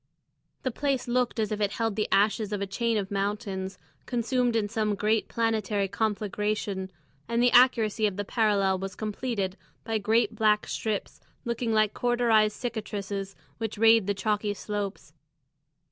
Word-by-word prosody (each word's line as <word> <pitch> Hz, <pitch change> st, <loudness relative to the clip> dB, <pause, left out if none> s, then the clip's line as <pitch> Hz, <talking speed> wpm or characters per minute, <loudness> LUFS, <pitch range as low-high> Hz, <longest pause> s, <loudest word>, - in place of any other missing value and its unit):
The 260 Hz, -, 0 dB
place 275 Hz, 0 st, -1 dB
looked 245 Hz, -1 st, 0 dB
as 215 Hz, -1 st, 0 dB
if 215 Hz, 0 st, -2 dB
it 205 Hz, -1 st, +1 dB
held 225 Hz, -3 st, -1 dB
the 215 Hz, 0 st, 0 dB
ashes 210 Hz, +1 st, +2 dB
of 205 Hz, -, -1 dB
a 200 Hz, -, -1 dB
chain 230 Hz, +3 st, 0 dB
of 195 Hz, -1 st, -3 dB
mountains, 195 Hz, -1 st, -2 dB, 0.3 s
consumed 245 Hz, 0 st, 0 dB
in 215 Hz, -2 st, +1 dB
some 215 Hz, -1 st, 0 dB
great 215 Hz, +2 st, +1 dB
planetary 215 Hz, -3 st, 0 dB
conflagration, 205 Hz, -2 st, -2 dB, 0.4 s
and 235 Hz, 0 st, +1 dB
the 245 Hz, 0 st, +4 dB
accuracy 225 Hz, -4 st, +4 dB
of 200 Hz, -2 st, -4 dB
the 205 Hz, -, -2 dB
parallel 200 Hz, -4 st, +2 dB
was 195 Hz, 0 st, -5 dB
completed 210 Hz, -2 st, -3 dB, 0.3 s
by 225 Hz, -1 st, -1 dB
great 220 Hz, +3 st, +2 dB
black 210 Hz, -1 st, +2 dB
strips 215 Hz, -3 st, -3 dB, 0.2 s
looking 235 Hz, 0 st, -1 dB
like 215 Hz, -1 st, +3 dB
cauterised 235 Hz, -3 st, +2 dB
cicatrices 200 Hz, -4 st, -4 dB, 0.2 s
which 225 Hz, -2 st, -3 dB
rayed 225 Hz, -2 st, +5 dB
the 205 Hz, -, +1 dB
chalky 210 Hz, 0 st, -1 dB
slopes. 200 Hz, -6 st, -5 dB
215 Hz, 155 wpm, -27 LUFS, 200-230 Hz, 0.4 s, rayed